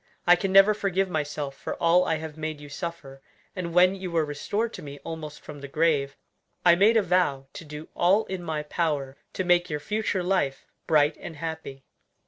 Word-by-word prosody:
I 175 - +7
can 190 +2 -2
never 195 +2 +7
forgive 195 -2 -1
myself 150 -2 -3
for - - -5
all 175 +2 +3
I 160 - +1
have 155 -1 -6
made 155 -1 -4
you 145 0 -11
suffer, 145 -4 -7 0.3
and 180 -3 -4
when 180 +2 +5
you 190 -1 -5
were 165 -2 +1
restored 205 +10 -2
to - - -8
me 140 -1 -8
almost 155 -2 -7
from 145 -1 -10
the 140 - -6
grave, 140 -2 +1 0.5
I 175 - +8
made 205 +6 +5
a 220 - +3
vow 175 -7 +1
to - - -8
do 150 0 -9
all 195 +5 +3
in 190 -1 -5
my 160 -3 -3
power 150 -4 -2 0.2
to 185 - -2
make 175 0 +3
your 150 -1 -2
future 205 +2 -1
life 175 -7 0 0.2
bright 150 -1 +3
and 165 - -8
happy." 160 -4 -6
165 Hz, 200 wpm, -26 LUFS, 150-185 Hz, 0.5 s, I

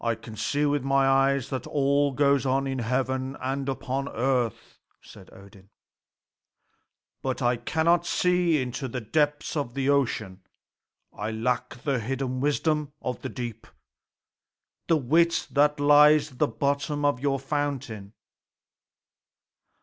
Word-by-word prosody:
"I 115 -1 +1
can 110 0 -11
see 145 +6 0
with 145 -2 0
my 135 0 +2
eyes 135 0 +2
all 140 +2 +1
that 135 - -9
goes 140 -1 +3
on 135 +1 +1
in 135 -1 -3
heaven 130 +2 -2
and 135 +1 -3
upon 135 +1 -3
earth," 125 -2 -2 0.2
said - - -15
Odin, 100 0 -16 1.5
"but 130 -1 -2
I 120 0 +3
cannot 165 +7 +1
see 180 -4 +2
into 130 +1 -3
the 125 +1 -4
depths 145 +7 -1
of 140 -4 -3
ocean. 130 -9 0 0.7
I 105 +2 -4
lack 120 +2 -2
the 140 -4 0
hidden 130 +2 -3
wisdom 150 +1 0
of 125 - -4
the - - -4
deep, 120 -3 -7 1.2
the 165 - +4
wit 165 +5 +2
that 145 +1 +2
lies 150 +1 +5
at 125 - -17
the - - +3
bottom 140 +4 -1
of 145 -3 +2
your 135 0 0
fountain. 135 -8 -4
135 Hz, 135 wpm, -26 LUFS, 125-145 Hz, 1.5 s, lies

